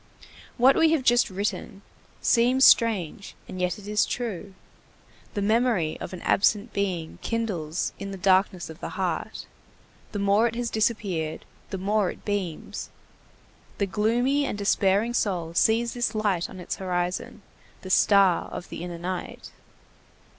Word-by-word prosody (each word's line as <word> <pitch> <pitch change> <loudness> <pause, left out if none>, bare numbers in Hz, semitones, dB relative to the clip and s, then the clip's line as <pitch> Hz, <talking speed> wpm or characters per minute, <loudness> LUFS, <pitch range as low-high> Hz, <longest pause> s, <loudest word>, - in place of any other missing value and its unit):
What 260 +2 +6
we 325 -1 +4
have 300 -5 +1
just 240 -1 +4
written 200 +1 -4 0.4
seems 250 +3 +4
strange, 200 -6 +3
and 185 -1 -6
yet 180 -1 0
it 205 -1 -12
is 210 0 +2
true. 205 -5 -4 0.8
The 205 - -1
memory 220 -7 +2
of - - -6
an 185 - -8
absent 210 +3 +2
being 180 -5 -2
kindles 190 -9 -2
in 200 - -5
the 195 - -6
darkness 190 -1 +2
of 160 0 -11
the - - -7
heart; - - -3 0.7
the 210 - -4
more 200 +3 +3
it 230 - -4
has 240 -1 -2
disappeared, 200 -8 -1 0.2
the 195 - -4
more 200 0 +1
it - - -10
beams; 195 -6 -4 0.9
the 200 - +1
gloomy 240 +8 +1
and 205 - -3
despairing 200 +2 +2
soul 180 -8 -1
sees 230 +6 +2
this 240 -2 -1
light 205 -5 0
on 185 - -10
its 180 - -4
horizon; 180 +2 -3 0.4
the 185 - -5
star 195 -3 +4
of - - -8
the - - -7
inner 175 -1 -6
night. 180 +1 -6
200 Hz, 150 wpm, -26 LUFS, 185-230 Hz, 0.9 s, What